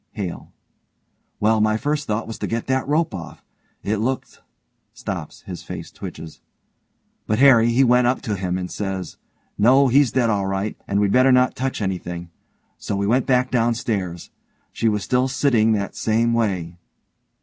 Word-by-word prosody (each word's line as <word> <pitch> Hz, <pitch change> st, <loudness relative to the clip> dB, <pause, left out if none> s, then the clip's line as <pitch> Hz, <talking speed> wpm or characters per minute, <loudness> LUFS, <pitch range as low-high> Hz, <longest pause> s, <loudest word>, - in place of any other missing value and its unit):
HALE: 95 Hz, -5 st, -6 dB, 0.9 s
Well, 110 Hz, +1 st, +3 dB
my 110 Hz, 0 st, +2 dB
first 145 Hz, +4 st, -2 dB
thought 105 Hz, +1 st, -1 dB
was 115 Hz, -, -8 dB
to -, -, -3 dB
get 115 Hz, 0 st, -2 dB
that 130 Hz, 0 st, -1 dB
rope 155 Hz, -2 st, +1 dB
off. 85 Hz, -4 st, -8 dB, 0.4 s
It 105 Hz, +2 st, -1 dB
looked... 130 Hz, +5 st, -3 dB, 0.5 s
(stops, -, -, -6 dB
his -, -, -8 dB
face -, -, -8 dB
twitches)... 80 Hz, -1 st, -9 dB, 0.9 s
but 110 Hz, -, +1 dB
Harry, 120 Hz, -3 st, +6 dB
he 120 Hz, +3 st, +3 dB
went 125 Hz, -1 st, +4 dB
up 125 Hz, -, +1 dB
to 105 Hz, -5 st, -2 dB
him, 90 Hz, -1 st, -2 dB
and 90 Hz, -1 st, -4 dB
he -, -, -10 dB
said, 95 Hz, -2 st, -3 dB, 0.5 s
'No, 130 Hz, +5 st, +5 dB
he's 135 Hz, 0 st, +4 dB
dead 120 Hz, -3 st, +2 dB
all 100 Hz, -2 st, 0 dB
right, 95 Hz, +2 st, -2 dB
and 100 Hz, -, 0 dB
we'd 100 Hz, -1 st, +2 dB
better 130 Hz, +3 st, +5 dB
not 125 Hz, 0 st, +3 dB
touch 130 Hz, -4 st, -2 dB
anything.' 90 Hz, -2 st, -4 dB, 0.5 s
So -, -, -3 dB
we 100 Hz, 0 st, -1 dB
went 120 Hz, +5 st, +1 dB
back 125 Hz, -1 st, +2 dB
down 120 Hz, -1 st, +2 dB
stairs. 95 Hz, -7 st, -3 dB, 0.4 s
She 115 Hz, -, 0 dB
was 105 Hz, -2 st, -1 dB
still 125 Hz, +4 st, +1 dB
sitting 125 Hz, -5 st, +2 dB
that 100 Hz, -2 st, -2 dB
same 115 Hz, +1 st, +1 dB
way. 90 Hz, -7 st, -1 dB
110 Hz, 175 wpm, -22 LUFS, 100-125 Hz, 0.9 s, Harry